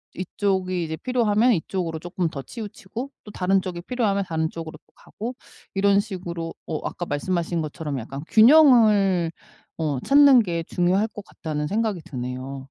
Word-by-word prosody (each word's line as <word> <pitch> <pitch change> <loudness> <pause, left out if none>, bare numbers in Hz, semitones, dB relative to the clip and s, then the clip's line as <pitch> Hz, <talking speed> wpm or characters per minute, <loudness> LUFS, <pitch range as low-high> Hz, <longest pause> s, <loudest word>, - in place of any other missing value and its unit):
이쪽이 185 -1 -1
이제 160 0 -4
필요하면 240 -1 +2
이쪽으로 165 -2 -2
쪼끔 175 0 -2
더 140 - -6
치우치고 220 - -7
또 210 - -11
다른 190 +1 +1
쪽이 175 -2 -5
필요하면 205 -6 0
다른 160 -1 -1
쪽으로 160 -1 -8
또 - - -43
가고 240 +4 -7 0.4
이런 200 +1 +4
식으로 175 -5 -6
어 155 -2 -4
아까 175 - -5
말씀하신 170 +2 -1
것처럼 150 -2 -4
약간 135 +5 -7
균형을 215 - +6 0.5
어 150 -5 -1
찾는 280 -3 +7
게 170 -3 -2
중요할 185 +6 +1
것 210 -2 -10
같다는 150 -6 -4
생각이 210 -3 -1
드네요. 130 +1 -6
185 Hz, 350 characters per minute, -24 LUFS, 160-210 Hz, 0.5 s, 찾는